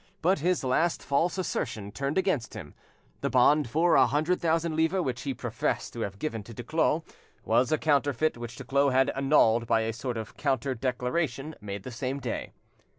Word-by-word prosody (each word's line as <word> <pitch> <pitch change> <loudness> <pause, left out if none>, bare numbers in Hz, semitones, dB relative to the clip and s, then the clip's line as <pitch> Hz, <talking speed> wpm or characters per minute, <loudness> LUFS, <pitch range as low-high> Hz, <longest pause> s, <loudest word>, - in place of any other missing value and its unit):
But 185 0 +3
his 175 +2 +1
last 160 +7 +1
false 165 +7 +1
assertion 110 - -3
turned 140 - -2
against 180 - 0
him: 85 -9 -8 0.5
the - - -1
bond 140 +2 +4
for 165 +7 +3
a - - +6
hundred 155 +5 0
thousand 165 -1 +1
livres 165 +4 +1
which 125 -4 -3
he 140 - -2
professed - - -2
to - - -7
have 100 0 -4
given 115 -2 -3
to 115 +2 -12
Duclos - - 0 0.4
was 125 0 +2
a 155 - +3
counterfeit 145 0 +1
which 120 0 -7
Duclos 140 +2 +1
had 130 +1 +3
annulled 135 -5 +3
by 115 - +3
a 110 0 -2
sort 125 +1 -4
of 110 - -7
counter 135 -2 0
declaration 130 +4 -2
made 100 -1 -6
the 130 - -7
same 130 +3 -3
day. 125 -3 -4
135 Hz, 185 wpm, -28 LUFS, 120-155 Hz, 0.5 s, a